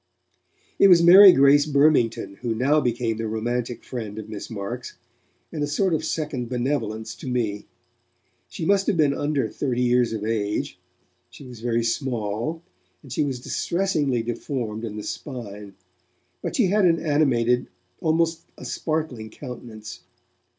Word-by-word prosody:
It - - +7
was 175 -3 +6
Mary 190 +3 +10
Grace 145 0 +5
Burmington 140 -9 +2
who 120 -2 -3
now 140 +6 +2
became 120 -3 -1
the 115 0 -3
romantic 120 +2 -3
friend 110 -5 -6
of 110 -1 -7
Miss 105 -2 -7
Marks, 115 +3 -6 0.5
and 155 - -5
a 145 - 0
sort 185 +5 +1
of 155 - 0
second 140 -7 -3
benevolence 120 -4 -2
to - - -10
me. 115 -5 -2 0.8
She - - -5
must 195 +2 +2
have 205 - +1
been 145 -3 +3
under 145 -4 -1
thirty 125 0 -2
years 125 -1 +2
of 110 -2 -4
age; 105 -2 -2 0.5
she 140 - -13
wax 125 -3 -11
very 115 0 0
small, 120 +5 -2 0.4
and 135 -4 -9
she 150 - +1
was 135 -3 -3
distressingly 150 -8 -1
deformed 115 -1 -4
in 105 -1 -6
the 105 - -5
spine, 105 -7 -7 0.7
but - - -4
she 240 - +3
had 200 +2 +2
an 165 -2 +4
animated, 130 -6 +1 0.3
almost 165 0 +1 0.2
a - - -10
sparkling 155 -9 -3
countenance. 115 -3 -9
125 Hz, 150 wpm, -24 LUFS, 115-150 Hz, 0.8 s, Mary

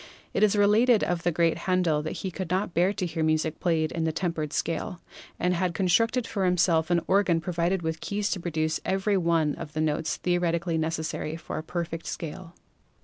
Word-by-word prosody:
It - - 0
is 215 -1 +4
related 215 +3 +4
of 175 -1 -1
the 175 - +1
great 165 0 +1
Handel 175 -5 +2
that 155 - -4
he 190 - -2
could 185 -1 -5
not 185 0 -1
bear 180 +3 +3
to 190 -2 -3
hear 165 -1 -3
music 155 0 0
played 160 -3 +1
in 165 - -2
the 160 - +1
tempered 160 -3 -2
scale, 165 +3 -2 0.4
and 180 +1 +2
had 175 -1 -1
constructed 230 +7 +2
for 200 -3 -2
himself 175 -3 +2
an 175 -1 +3
organ 190 -4 +3
provided 175 +1 -1
with 160 0 -3
keys 205 0 -2
to 190 - -1
produce 160 -2 -1
every 195 +2 +1
one 165 -3 +2
of 150 - -8
the 155 - -3
132 - - +2
PHYSICS - - +2
notes 155 +1 -1
theoretically 170 -1 0
necessary 160 -1 -2
for 165 - -5
a - - -6
perfect 165 0 -4
scale. 170 +2 -6
170 Hz, 205 wpm, -27 LUFS, 160-185 Hz, 0.4 s, is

